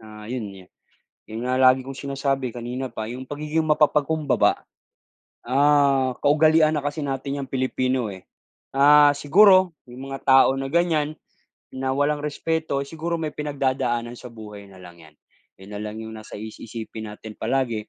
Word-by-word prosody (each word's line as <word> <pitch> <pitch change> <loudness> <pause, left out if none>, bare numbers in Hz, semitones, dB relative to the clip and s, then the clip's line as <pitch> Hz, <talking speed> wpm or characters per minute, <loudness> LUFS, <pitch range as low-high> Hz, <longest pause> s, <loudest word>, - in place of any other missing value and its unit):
na 105 -1 -12
yun 115 -5 -4 0.2
yun, - - -28 0.6
yun 110 +1 -7
nga 130 - +1
lagi 130 0 +5
kong 135 +1 -8
sinasabi 135 -2 -2
kanina 125 +2 -5
pa 110 0 -5
yung 125 +2 -7
pagiging 150 +3 -2
mapapag-kumbaba. 150 -3 +2 0.8
Ah, 140 0 +3
kaugalian 155 +1 +4
na 145 - -4
kasi 145 +2 -3
natin 140 0 -3
yang 135 - -7
Pilipino 130 -1 -1
eh. 95 - -11 0.5
Ah, 145 +1 +5
siguro, 185 +3 +5 0.2
may 120 - -11
mga 135 +1 -7
tao 135 -1 +5
na 135 0 -4
ganyan, 155 -2 0 0.5
na 130 0 -2
walang 145 +2 +1
respeto, 150 -1 -2
siguro 165 +4 -4
may 155 -1 -3
pinagdadaanan 130 -5 -2
sa - - -11
buhay 105 -3 -11
na 95 - -15
lang 85 -1 -13
yan. 75 - -20 0.4
Yun 95 +1 -13
nalang 105 +1 -6
yung 110 0 -7
nasa 110 - -10
is 110 +1 -8
isipin 110 -1 -7
natin 105 +1 -10
palagi 115 -1 -2
135 Hz, 160 wpm, -23 LUFS, 120-145 Hz, 0.8 s, lagi